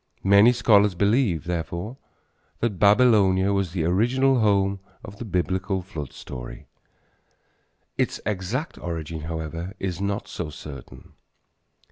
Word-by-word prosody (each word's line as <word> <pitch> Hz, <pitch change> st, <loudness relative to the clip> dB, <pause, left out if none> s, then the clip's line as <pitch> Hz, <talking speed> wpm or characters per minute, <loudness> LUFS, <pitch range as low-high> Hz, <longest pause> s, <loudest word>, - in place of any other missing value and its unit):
Many 100 Hz, +4 st, +6 dB
scholars 105 Hz, -5 st, +4 dB
believe, 100 Hz, -, +2 dB
therefore, 85 Hz, +6 st, -4 dB, 0.6 s
that 105 Hz, -6 st, -1 dB
Babylonia 100 Hz, -3 st, +4 dB
was 100 Hz, -3 st, 0 dB
the 85 Hz, -3 st, -2 dB
original 125 Hz, +9 st, +2 dB
home 100 Hz, -2 st, +2 dB, 0.3 s
of 100 Hz, +1 st, -11 dB
the 120 Hz, -, -5 dB
Biblical 95 Hz, 0 st, -1 dB
flood 80 Hz, -8 st, -7 dB
story. -, -, -9 dB, 1.3 s
Its -, -, 0 dB
exact 105 Hz, -, -3 dB
origin, 80 Hz, -2 st, -5 dB
however, 80 Hz, +3 st, -5 dB
is 95 Hz, -1 st, -3 dB
not 100 Hz, +1 st, -2 dB
so 75 Hz, -, -5 dB
certain. 70 Hz, -3 st, -11 dB
95 Hz, 115 wpm, -24 LUFS, 85-105 Hz, 1.3 s, Many